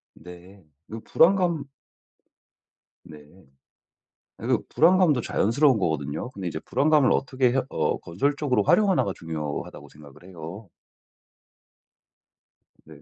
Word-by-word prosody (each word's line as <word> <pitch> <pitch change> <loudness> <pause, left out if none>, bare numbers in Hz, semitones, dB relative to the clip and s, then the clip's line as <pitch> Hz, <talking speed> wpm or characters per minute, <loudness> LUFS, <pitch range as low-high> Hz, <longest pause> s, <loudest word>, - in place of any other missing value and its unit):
네 90 +2 -14 0.2
그 110 +1 -8
불안감 170 -5 +2 1.4
네. 75 - -13 1.2
그 - - 0
불안감도 170 -5 +3
자연스러운 120 +4 +2
거거든요. 80 - -3
근데 95 -7 -6
이제 80 - -5
'불안감을 145 +2 +2
어떻게 130 -2 0
해 135 - +1
어 - - -1
건설적으로 140 - -1
활용하나.'가 190 - +2
중요하다고 75 -3 -6
생각을 75 +2 -17
해요. 95 +3 -10 2.2
네. 75 -2 -15
110 Hz, 250 characters per minute, -24 LUFS, -, 2.2 s, 불안감도